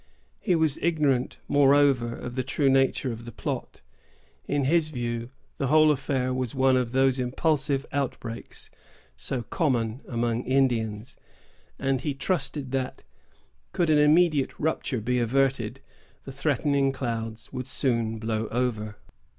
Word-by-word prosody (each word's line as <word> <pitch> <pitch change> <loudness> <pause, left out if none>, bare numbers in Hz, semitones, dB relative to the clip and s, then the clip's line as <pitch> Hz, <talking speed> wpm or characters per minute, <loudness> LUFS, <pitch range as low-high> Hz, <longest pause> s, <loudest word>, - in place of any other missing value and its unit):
He 180 - +1
was 160 -3 +1
ignorant, 145 -6 +1
moreover, 140 -4 +4
of 120 - -7
the 130 - -1
true 135 +1 +1
nature 135 -1 +2
of 115 0 -7
the 120 - -7
plot. - - -5 0.7
In 145 -1 0
his 155 +3 +2
view, 120 -3 -3 0.3
the 135 - 0
whole 155 +2 +6
affair 130 -2 -1
was 130 -1 -3
one 130 0 +4
of 125 -2 0
those 130 0 +3
impulsive 135 +2 0
outbreaks 125 -4 -4 0.4
so 130 -3 -3
common 120 -3 -1
among 120 -1 -1
Indians; 120 -4 0 0.6
and 135 -1 0
he 145 -3 -2
trusted 140 -4 -2
that, 130 -1 -3 0.7
could 170 -3 +2
an 150 - +5
immediate 150 -1 +3
rupture 145 -5 -1
be 125 +3 0
averted, 125 -1 0 0.4
the 135 - -8
threatening 140 0 +1
clouds 115 -4 -5
would 130 0 -4
soon 115 -4 0
blow 110 0 -2
over. 110 -4 -2
130 Hz, 135 wpm, -26 LUFS, 120-140 Hz, 0.7 s, whole